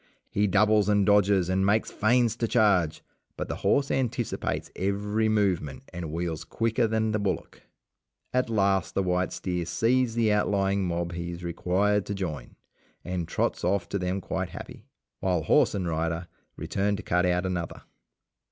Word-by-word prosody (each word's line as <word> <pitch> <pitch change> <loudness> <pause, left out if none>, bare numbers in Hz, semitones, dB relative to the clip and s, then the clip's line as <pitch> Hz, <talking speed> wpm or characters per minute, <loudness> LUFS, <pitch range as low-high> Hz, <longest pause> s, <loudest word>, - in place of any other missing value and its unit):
He 105 +1 +2
doubles 105 +1 +3
and 100 -1 +3
dodges 100 -3 +4
and 95 +1 +1
makes 105 +3 +2
feints 115 +1 +2
to 115 - 0
charge, 100 -9 +2 0.3
but - - -4
the - - -3
horse 140 -1 +1
anticipates 125 -3 -2
every 105 +3 0
movement 95 -10 0
and 85 -3 -5
wheels 85 -1 -3
quicker 115 +1 0
than 110 0 0
the 105 - 0
bullock. 100 -2 -3 0.7
At 125 -1 +1
last 100 -4 +1
the 95 - +2
white 90 0 0
steer 90 -2 -2
sees 115 +6 +1
the 110 -2 +3
outlying 100 -1 +1
mob 85 0 -2
he 85 0 -4
is 85 0 -7
required 95 +4 0
to 100 - -2
join, 80 -10 -5 0.5
and 90 -2 -3
trots - - -1
off 90 -1 +1
to 100 - -1
them 90 +1 -2
quite 95 -1 -3
happy, - - -10 0.3
while 90 -4 0
horse - - +3
and 95 -3 -2
rider 85 +2 -2 0.3
return 100 +1 -1
to 105 - -7
cut 90 +1 +2
out 90 +1 +1
another. 90 -2 -4
95 Hz, 165 wpm, -27 LUFS, 90-105 Hz, 0.7 s, dodges